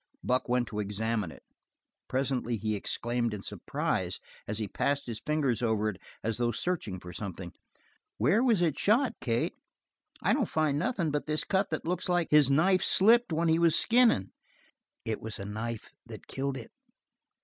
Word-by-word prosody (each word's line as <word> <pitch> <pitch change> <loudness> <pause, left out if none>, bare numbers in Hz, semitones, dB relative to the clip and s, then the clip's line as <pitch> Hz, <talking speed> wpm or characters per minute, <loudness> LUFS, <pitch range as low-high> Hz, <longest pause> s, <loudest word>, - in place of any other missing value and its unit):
Buck 125 0 0
went 125 0 +1
to 105 - -4
examine 105 -2 -2
it. - - -15 0.6
Presently 130 -3 -1
he 110 +1 -2
exclaimed 120 +2 -1
in 100 - -8
surprise - - -2 0.3
and 105 - -2
he 110 -2 -2
passed 140 +7 -1
his 115 -3 -5
fingers 145 -6 0
over 110 -2 +1
it 100 - -6 0.3
as 110 -1 -1
though 120 -1 +1
searching 115 - -2
for 90 0 -10
something. 95 -2 -6 0.6
"Where 220 +6 +3
was 225 -8 +3
it 155 -5 0
shot, 240 +6 +3
Kate? 115 -2 0 0.7
I - - +3
don't - - +2
find 155 -2 +1
nothin' 180 -7 0
but 145 +1 -2
this 155 0 0
cut 195 0 0
that 155 - -3
looks 180 +2 -2
like 175 -2 +1
his 150 -3 +6
knife 175 +7 +4
slipped 230 +2 +5
when 165 +1 +1
he 160 0 +3
was 165 -2 +5
skinnin'." 230 - +4 0.7
"It 110 -1 -3
was 110 0 -6
a 100 - -6
knife 110 +2 -5 0.2
that - - -10
killed 135 0 -3
it." 115 - -10
130 Hz, 175 wpm, -29 LUFS, 110-165 Hz, 0.7 s, his